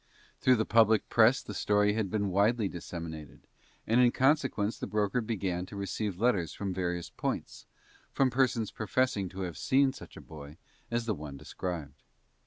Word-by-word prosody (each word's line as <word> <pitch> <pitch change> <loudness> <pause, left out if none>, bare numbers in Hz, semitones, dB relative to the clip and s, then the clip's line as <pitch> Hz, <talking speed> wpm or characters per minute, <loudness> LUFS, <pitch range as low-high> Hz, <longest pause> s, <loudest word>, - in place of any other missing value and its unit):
Through 130 - +5
the 110 -1 0
public 110 -1 +4
press 115 +3 +4
the 105 - -7
story 105 +1 +2
had 105 -3 -1
been 100 -1 -1
widely 105 +3 +2
disseminated, 80 -4 -8 0.4
and 115 +3 +3
in 120 -1 +5
consequence 130 -6 +1
the - - -4
broker 105 +3 0
began 95 -5 -2
to - - -10
receive 100 -1 -3
letters 100 -9 +1
from 100 -2 -4
various 90 -1 -3
points, - - -4 0.4
from 135 -2 +2
persons 120 -4 +1
professing 110 -3 0
to 95 +2 -7
have 90 -4 -5
seen 135 0 +3
such - - -12
a - - -8
boy 75 -1 -11 0.3
as 120 0 -1
the 110 - 0
one 75 -5 -8
described. 80 -3 -6
105 Hz, 170 wpm, -30 LUFS, 90-115 Hz, 0.4 s, Through